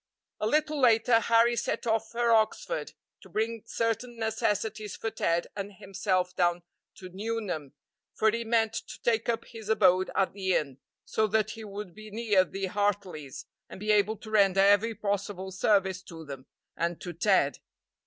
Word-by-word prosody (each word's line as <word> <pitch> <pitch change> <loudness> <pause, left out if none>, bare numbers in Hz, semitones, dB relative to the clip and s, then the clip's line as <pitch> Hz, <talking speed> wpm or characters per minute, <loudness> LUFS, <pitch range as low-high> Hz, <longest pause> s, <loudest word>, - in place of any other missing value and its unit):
A 210 - 0
little 305 +3 +1
later 230 -2 +5
Harry 230 +1 +4
set 240 - -2
off 225 -1 0
for 235 0 +1
Oxford, 225 - +1 0.3
to - - -15
bring 225 +1 -2
certain 230 +1 -2
necessities 220 -1 -1
for 225 - -4
Ted 170 -3 0
and 200 0 -5
himself 185 -1 -1
down 175 -1 +1 0.3
to 185 -4 -10
Nuneham, 190 -7 -4 0.4
for 220 0 +3
he 230 +1 -2
meant 225 -1 +1
to - - -6
take 225 -1 +1
up 230 - -1
his 220 -2 -10
abode 185 -4 +4
at 195 - +1
the 190 -2 0
inn, 140 -3 -2 0.3
so 220 - +1
that 215 0 +1
he 220 +1 -8
would 205 -3 -7
be 215 +2 -11
near 210 -3 +2
the 195 +1 -4
Hartleys, 190 -8 -2 0.2
and - - -10
be 210 +2 0
able 210 +1 +3
to 215 0 -11
render 195 -3 +4
every 205 +3 +4
possible 200 -2 -3
service 190 -1 +2
to 165 -3 -11
them 135 -2 -9 0.3
and 170 0 -2
to 175 - -6
Ted. 170 -5 +2
210 Hz, 170 wpm, -28 LUFS, 185-225 Hz, 0.4 s, later